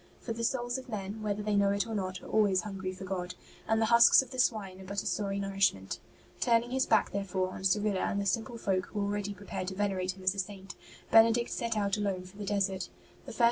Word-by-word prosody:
For 230 Hz, -, -4 dB
the 230 Hz, +1 st, -5 dB
souls 245 Hz, +1 st, -1 dB
of 255 Hz, -, -12 dB
men, 210 Hz, 0 st, -5 dB
whether 210 Hz, -1 st, -2 dB
they 210 Hz, 0 st, 0 dB
know 200 Hz, 0 st, +4 dB
it 200 Hz, 0 st, +1 dB
or 225 Hz, -, -5 dB
not, 185 Hz, -3 st, -3 dB
are -, -, -10 dB
always 205 Hz, -4 st, +3 dB
hungry 195 Hz, -3 st, -4 dB
for 185 Hz, +1 st, -9 dB
God, 180 Hz, -1 st, -4 dB, 0.3 s
and 225 Hz, 0 st, +2 dB
the 225 Hz, -, +3 dB
husks 235 Hz, +3 st, +7 dB
of 260 Hz, -, -15 dB
the 255 Hz, -, -5 dB
swine 195 Hz, -6 st, 0 dB
are -, -, -10 dB
but 200 Hz, +1 st, -3 dB
a -, -, -13 dB
sorry 200 Hz, -1 st, -1 dB
nourishment. 195 Hz, -, 0 dB, 0.4 s
Turning 235 Hz, 0 st, +2 dB
his 260 Hz, 0 st, +1 dB
back, 220 Hz, -2 st, +3 dB
therefore, 190 Hz, -2 st, -1 dB
on 185 Hz, -, -8 dB
Cyrilla 200 Hz, +1 st, +2 dB
and 200 Hz, -, -1 dB
the 200 Hz, -, -2 dB
simple 225 Hz, +5 st, -1 dB
folk 190 Hz, -4 st, -1 dB
who 210 Hz, -, -5 dB
were 200 Hz, -, +1 dB
already 205 Hz, 0 st, -2 dB
prepared 190 Hz, -1 st, -5 dB
to 190 Hz, -, -4 dB
venerate 190 Hz, -2 st, -1 dB
him 190 Hz, -, -12 dB
as 185 Hz, +1 st, +3 dB
a 200 Hz, -, -6 dB
Saint, 195 Hz, 0 st, -5 dB, 0.4 s
Benedict 230 Hz, +1 st, +5 dB
set 230 Hz, -2 st, -2 dB
out 200 Hz, -1 st, +1 dB
alone 195 Hz, -3 st, -1 dB
for 185 Hz, +2 st, -14 dB
the 205 Hz, -, -5 dB
desert. 195 Hz, -1 st, -1 dB
200 Hz, 240 wpm, -31 LUFS, 190-220 Hz, 0.4 s, husks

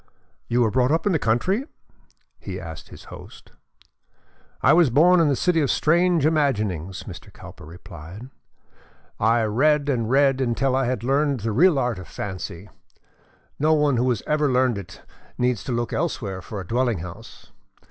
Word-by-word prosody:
"You 120 Hz, +1 st, +1 dB
were 110 Hz, -3 st, +2 dB
brought 130 Hz, +1 st, +2 dB
up 165 Hz, +5 st, 0 dB
in 205 Hz, -, +2 dB
the 160 Hz, -, +1 dB
country?" 185 Hz, -, 0 dB, 0.7 s
he -, -, -7 dB
asked -, -, -9 dB
his -, -, -13 dB
host. -, -, -13 dB, 1.1 s
"I -, -, +6 dB
was 170 Hz, -5 st, +5 dB
born 170 Hz, +8 st, +5 dB
in 165 Hz, -, +3 dB
the 140 Hz, -, +2 dB
City 165 Hz, +4 st, +1 dB
of 140 Hz, -, 0 dB
Strange 170 Hz, 0 st, +2 dB
Imaginings," 105 Hz, -, -1 dB
Mr. -, -, -11 dB
Cowper 75 Hz, -, -13 dB
replied. 90 Hz, -, -11 dB, 0.9 s
"I 115 Hz, +2 st, +2 dB
read 145 Hz, +7 st, +2 dB
and 115 Hz, -5 st, -1 dB
read 135 Hz, 0 st, +3 dB
until 130 Hz, +1 st, 0 dB
I 135 Hz, 0 st, +1 dB
had 125 Hz, -2 st, -2 dB
learned 140 Hz, 0 st, 0 dB
the 115 Hz, +1 st, -2 dB
real 160 Hz, -, +4 dB
art 125 Hz, -6 st, -1 dB
of 95 Hz, -, -10 dB
fancy. 95 Hz, -1 st, -7 dB, 0.9 s
No 155 Hz, +2 st, +3 dB
one 145 Hz, -4 st, +2 dB
who 125 Hz, +2 st, +1 dB
has 120 Hz, -5 st, -1 dB
ever 150 Hz, -2 st, +1 dB
learned 125 Hz, -4 st, +1 dB
it 100 Hz, -, -12 dB, 0.3 s
needs 125 Hz, -3 st, 0 dB
to -, -, -4 dB
look 120 Hz, 0 st, -2 dB
elsewhere 105 Hz, -, -3 dB
for 100 Hz, +3 st, -7 dB
a 95 Hz, -, -7 dB
dwelling 120 Hz, -1 st, 0 dB
house. 85 Hz, -1 st, -11 dB
125 Hz, 170 wpm, -23 LUFS, 110-150 Hz, 1.1 s, I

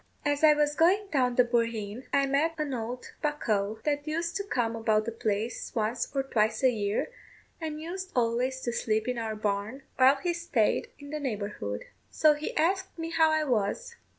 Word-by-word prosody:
As 290 Hz, +1 st, 0 dB
I 305 Hz, -1 st, +8 dB
was 295 Hz, 0 st, +2 dB
going 380 Hz, +7 st, +3 dB
down 250 Hz, -4 st, +2 dB
the 250 Hz, -, +6 dB
bohereen 230 Hz, -1 st, -1 dB
I 280 Hz, -1 st, +3 dB
met 290 Hz, +4 st, +1 dB
an 300 Hz, -3 st, -2 dB
old 245 Hz, +1 st, -5 dB
bocough, 220 Hz, -8 st, 0 dB
that 290 Hz, 0 st, -1 dB
used 335 Hz, +3 st, -2 dB
to 400 Hz, -, -2 dB
come 240 Hz, -, -1 dB
about 220 Hz, -1 st, +1 dB
the 230 Hz, -, -2 dB
place 220 Hz, +1 st, -3 dB
once 225 Hz, +1 st, 0 dB
or 270 Hz, -, +2 dB
twice 220 Hz, -3 st, 0 dB
a 260 Hz, -, +6 dB
year, 210 Hz, -, -1 dB, 0.5 s
and 310 Hz, -1 st, -4 dB
used 370 Hz, +4 st, -6 dB
always 250 Hz, +2 st, +1 dB
to 240 Hz, -, -2 dB
sleep 220 Hz, -1 st, 0 dB
in 250 Hz, -1 st, -1 dB
our 220 Hz, -1 st, -3 dB
barn 215 Hz, +5 st, -2 dB
while 265 Hz, +2 st, +6 dB
he 345 Hz, +5 st, -1 dB
staid 335 Hz, -11 st, +1 dB
in 285 Hz, -1 st, -11 dB
the 305 Hz, -, -3 dB
neighbourhood. 205 Hz, -, -4 dB, 0.2 s
So 310 Hz, -1 st, +4 dB
he 295 Hz, +1 st, -5 dB
asked 380 Hz, +4 st, +1 dB
me 330 Hz, 0 st, -4 dB
how 325 Hz, -1 st, +4 dB
I 315 Hz, 0 st, +2 dB
was. 235 Hz, -, -1 dB
260 Hz, 190 wpm, -28 LUFS, 220-305 Hz, 0.5 s, I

